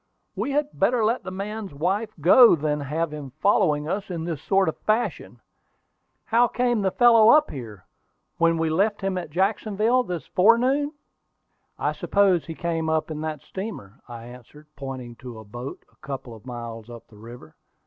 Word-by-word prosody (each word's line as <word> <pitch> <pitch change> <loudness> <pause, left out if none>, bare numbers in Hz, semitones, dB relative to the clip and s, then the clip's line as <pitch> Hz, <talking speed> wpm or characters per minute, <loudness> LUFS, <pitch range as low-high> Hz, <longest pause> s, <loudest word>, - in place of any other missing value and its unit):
"We - - -2
had 290 +1 0
better 225 +3 +2
let 230 +3 +1
the 190 - -7
man's 200 -2 -6
wife 195 +9 -1
go 190 - +7
than 150 -1 -1
have 150 +3 -2
him 140 -4 -8
following 150 -6 +2
us 195 +4 -3
in 170 -3 -4
this 165 -4 -4
sort 195 +1 +2
of 160 - -1
fashion. 220 +3 -2 0.9
How 235 +2 +3
came 240 -1 0
the 195 - +2
fellow 230 +1 +6
up 305 +3 +5
here, 110 -8 -9 0.5
when 165 0 +3
we 160 -1 0
left 205 +6 +1
him 195 -1 -1
at 175 - -7
Jacksonville 210 +7 +1
this 180 -8 -5
forenoon?" 255 +9 +3 0.8
"I - - 0
suppose 195 -4 +1
he 165 - -6
came 165 -1 -2
up 160 0 0
in 155 -1 -5
that 155 -1 -4
steamer," 190 - -8
I 115 -2 -9
answered, 125 +5 -14
pointing 130 -4 -7
to 120 -2 -10
a 110 - -10
boat 120 +6 -8
a - - -31
couple 135 -3 -7
of 115 +3 -14
miles 115 -2 -7
up 120 -1 -11
the 105 - -18
river. 115 -8 -12
165 Hz, 180 wpm, -24 LUFS, 135-215 Hz, 0.9 s, go